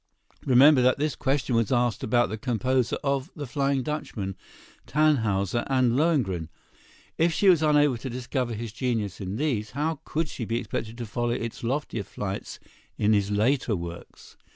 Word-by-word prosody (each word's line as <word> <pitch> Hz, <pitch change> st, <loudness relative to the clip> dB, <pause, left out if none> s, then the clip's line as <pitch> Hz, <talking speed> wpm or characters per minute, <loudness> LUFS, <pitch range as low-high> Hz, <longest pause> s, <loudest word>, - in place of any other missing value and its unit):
Remember 135 Hz, +2 st, +7 dB
that 130 Hz, +1 st, +3 dB
this 150 Hz, 0 st, -1 dB
question 135 Hz, -2 st, 0 dB
was 115 Hz, 0 st, +1 dB
asked 120 Hz, -3 st, +1 dB
about 120 Hz, +2 st, +2 dB
the 110 Hz, -, -4 dB
composer 125 Hz, +1 st, 0 dB
of 140 Hz, +1 st, -1 dB
"The 150 Hz, -, -5 dB
Flying 135 Hz, +1 st, 0 dB
Dutchman," 125 Hz, -10 st, -4 dB, 0.5 s
"Tannhäuser" 120 Hz, -8 st, +2 dB
and 130 Hz, -3 st, +3 dB
"Lohengrin." 125 Hz, -, +1 dB, 0.7 s
If 165 Hz, +1 st, +4 dB
she 200 Hz, -, +1 dB
was 175 Hz, -5 st, +6 dB
unable 150 Hz, -4 st, +3 dB
to 130 Hz, +3 st, -6 dB
discover 125 Hz, -1 st, -3 dB
his 115 Hz, 0 st, -5 dB
genius 115 Hz, -7 st, -2 dB
in 95 Hz, +1 st, -4 dB
these, 115 Hz, -6 st, -1 dB
how 155 Hz, 0 st, -1 dB
could 160 Hz, +1 st, -2 dB
she 135 Hz, -, -6 dB
be 115 Hz, +1 st, -1 dB
expected 115 Hz, -1 st, -4 dB
to 120 Hz, -, -4 dB
follow 120 Hz, +3 st, -2 dB
its 115 Hz, -1 st, -3 dB
loftier 130 Hz, -2 st, -2 dB
flights 100 Hz, 0 st, -6 dB, 0.4 s
in 105 Hz, +1 st, +3 dB
his 100 Hz, -1 st, +2 dB
later 110 Hz, +3 st, +1 dB
works? 85 Hz, -1 st, -9 dB
125 Hz, 165 wpm, -26 LUFS, 110-140 Hz, 0.7 s, Remember